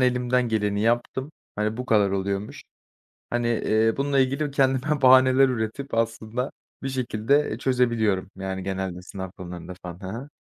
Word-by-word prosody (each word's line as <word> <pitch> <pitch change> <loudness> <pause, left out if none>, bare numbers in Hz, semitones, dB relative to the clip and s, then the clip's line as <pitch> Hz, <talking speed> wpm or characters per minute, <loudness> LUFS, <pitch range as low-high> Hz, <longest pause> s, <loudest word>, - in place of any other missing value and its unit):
elimden 125 -1 +2
geleni 105 -2 0
yaptım. 120 +6 0 0.2
Hani, 105 +1 -1
bu 125 - -5
kadar 105 -4 +3
oluyormuş." 100 +1 -3 0.7
Hani, 120 0 0
eee, 110 -1 +2
bununla 140 0 +1
ilgili 140 +3 +1
kendime 135 +2 +1
bahaneler 130 +1 +6
üretip 125 +4 -3
aslında 115 +3 -1 0.3
bir 135 - -2
şekilde, 130 +2 +1
eee, 110 - -3
çözebiliyorum, 115 -7 +1
yani, 95 0 -4
genelde 95 -1 -3
sınav 95 -1 -7
konularında 90 0 -8
falan. 90 0 -7
Hı 95 - -7
hı. 140 +3 -10
115 Hz, 150 wpm, -25 LUFS, 100-130 Hz, 0.7 s, bahaneler